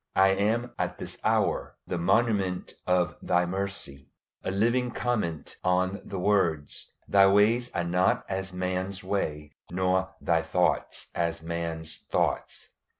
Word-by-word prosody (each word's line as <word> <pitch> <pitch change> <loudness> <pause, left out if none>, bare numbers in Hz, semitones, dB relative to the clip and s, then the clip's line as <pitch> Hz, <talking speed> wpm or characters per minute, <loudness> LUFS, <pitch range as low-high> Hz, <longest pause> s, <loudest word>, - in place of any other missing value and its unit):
I 95 0 +6
am 110 +5 +1
at - - -1
this - - -5
hour - - +1
the 90 - -3
monument 95 0 +1
of 90 -1 +2
Thy 90 0 +2
mercy 95 -7 -5 0.3
a - - -2
living 120 +6 +2
comment 110 -10 -2
on 90 +2 +1
the 100 - -6
words, 90 -7 0 0.2
"Thy 100 -1 +6
ways 110 +5 +4
are 85 - +1
not 90 +2 +2
as 95 0 -3
man's 95 +1 -2
ways, 75 -6 -2 0.2
nor 95 +1 0
Thy 85 -1 +2
thoughts 90 +1 0
as 85 -1 -1
man's 80 -1 -2
thoughts." - - -1
95 Hz, 135 wpm, -28 LUFS, 85-100 Hz, 0.3 s, I